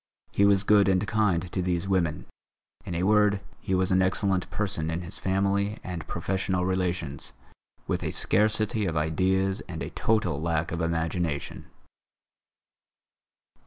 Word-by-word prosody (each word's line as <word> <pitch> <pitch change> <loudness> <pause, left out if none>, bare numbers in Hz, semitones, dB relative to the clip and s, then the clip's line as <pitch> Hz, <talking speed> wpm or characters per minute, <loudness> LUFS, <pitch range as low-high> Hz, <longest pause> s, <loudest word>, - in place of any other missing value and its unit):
He 100 - +3
was 100 -1 +4
good 100 -1 +5
and 95 +1 +2
kind 95 -5 +1
to 95 - -1
these 90 0 -1
women. 85 -6 0 0.6
In 85 - -4
a 85 - -1
word, 105 0 +4 0.2
he 95 - -1
was 95 0 +1
an 95 0 +4
excellent 95 0 +1
person 95 -6 -2
in 80 +2 -2
his 85 - -5
family 100 +2 0
and 85 -4 -6
professional 95 -1 -1
relations, 90 -6 -2 0.5
with - - -2
a - - -1
scarcity 110 0 +1
of 80 -2 -2
ideas 95 +5 +1
and 80 -2 -5
a - - -6
total 105 -10 0
lack 80 -1 -1
of 85 +1 -2
imagination. 80 -2 -2
95 Hz, 145 wpm, -27 LUFS, 85-100 Hz, 0.6 s, good